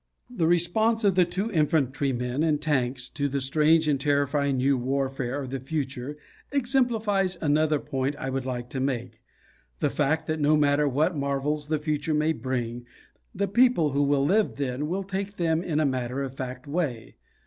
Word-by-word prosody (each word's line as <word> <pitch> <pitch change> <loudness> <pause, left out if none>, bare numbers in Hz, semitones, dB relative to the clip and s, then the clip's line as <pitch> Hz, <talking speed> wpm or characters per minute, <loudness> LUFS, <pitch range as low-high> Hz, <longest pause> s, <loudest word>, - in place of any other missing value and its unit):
The 175 -10 0
response 220 +7 +2
of 200 -2 +4
the 180 -1 +4
two 190 +6 -2
infantrymen 135 - 0
in 155 -2 +2
"Tanks" 130 -4 -1
to 145 -1 -2
the 140 +1 -1
strange 155 +4 +3
and 140 -3 +1
terrifying 140 -1 +1
new 135 +2 +3
warfare 135 0 -2
of 130 - -7
the 135 - -3
future 135 0 -4 0.3
exemplifies 230 -8 +1
another 155 0 +2
point 135 -1 -2
I 135 -2 -4
would 135 0 -2
like 125 -2 -4
to 135 - -3
make 125 -3 -3 0.6
the - - +1
fact 150 +2 0
that 155 0 -2
no 150 +1 +4
matter 145 0 +3
what 155 +6 +1
marvels 140 +1 -1
the 155 0 +1
future 150 0 -1
may 155 +1 +2
bring, 120 -2 -4 0.5
the 200 +1 0
people 235 - +3
who 140 +1 +1
will 140 -1 +2
live 205 +7 +2
then 140 +1 -2
will 190 +4 -2
take 195 +1 -4
them 165 -2 +1
in 160 -4 -1
a 155 - +2
matter 130 0 -1
of 135 -2 -5
fact 130 -1 -6
way. 140 -7 -3
145 Hz, 180 wpm, -26 LUFS, 135-165 Hz, 0.6 s, of